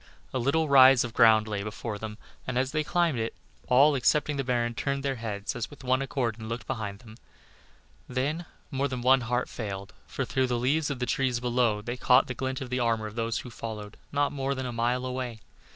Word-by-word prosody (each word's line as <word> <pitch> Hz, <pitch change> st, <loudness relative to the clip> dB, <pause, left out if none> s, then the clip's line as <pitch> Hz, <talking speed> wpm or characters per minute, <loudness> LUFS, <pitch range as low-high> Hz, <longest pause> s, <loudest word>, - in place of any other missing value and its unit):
A 130 Hz, -, 0 dB
little 155 Hz, +6 st, +2 dB
rise 135 Hz, -2 st, +7 dB
of 120 Hz, -2 st, -5 dB
ground 110 Hz, -2 st, +5 dB
lay 105 Hz, -2 st, -2 dB
before 105 Hz, 0 st, -5 dB
them, 110 Hz, -1 st, -6 dB, 0.3 s
and 130 Hz, -1 st, -2 dB
as 130 Hz, +1 st, +1 dB
they 155 Hz, 0 st, 0 dB
climbed 170 Hz, -5 st, +1 dB
it, 115 Hz, 0 st, -3 dB, 0.3 s
all, 140 Hz, +4 st, +6 dB
excepting 150 Hz, +3 st, +2 dB
the 135 Hz, -, -1 dB
baron, 120 Hz, -2 st, 0 dB
turned 140 Hz, +3 st, -2 dB
their 135 Hz, -2 st, -1 dB
heads 105 Hz, -3 st, -4 dB
as 120 Hz, -2 st, -3 dB
with 145 Hz, -, -13 dB
one 130 Hz, +1 st, +2 dB
accord 125 Hz, -5 st, -2 dB
and 110 Hz, 0 st, -7 dB
looked 115 Hz, +1 st, -4 dB
behind 110 Hz, -6 st, -4 dB
them. 110 Hz, -2 st, -13 dB, 0.9 s
Then 145 Hz, +7 st, -2 dB, 0.2 s
more 135 Hz, +1 st, 0 dB
than 125 Hz, -2 st, -4 dB
one 130 Hz, +1 st, +5 dB
heart 120 Hz, +2 st, -1 dB
failed, 100 Hz, -3 st, -6 dB
for -, -, -3 dB
through 130 Hz, -1 st, +1 dB
the 120 Hz, -1 st, 0 dB
leaves 145 Hz, +6 st, +1 dB
of 140 Hz, -, -2 dB
the 125 Hz, -, -1 dB
trees 125 Hz, -1 st, 0 dB
below, 120 Hz, -4 st, +1 dB
they 120 Hz, +3 st, -4 dB
caught 125 Hz, +1 st, +5 dB
the 130 Hz, -, -4 dB
glint 130 Hz, +2 st, -3 dB
of 125 Hz, -1 st, -5 dB
armor 115 Hz, -3 st, +1 dB
of 105 Hz, -, -6 dB
those 115 Hz, 0 st, -1 dB
who 125 Hz, -, -8 dB
followed 110 Hz, -2 st, -7 dB, 0.2 s
not 145 Hz, 0 st, +1 dB
more 135 Hz, -1 st, -2 dB
than 130 Hz, -1 st, -4 dB
a 125 Hz, -, -4 dB
mile 120 Hz, +2 st, 0 dB
away. 125 Hz, -3 st, -4 dB
125 Hz, 220 wpm, -28 LUFS, 115-135 Hz, 0.9 s, rise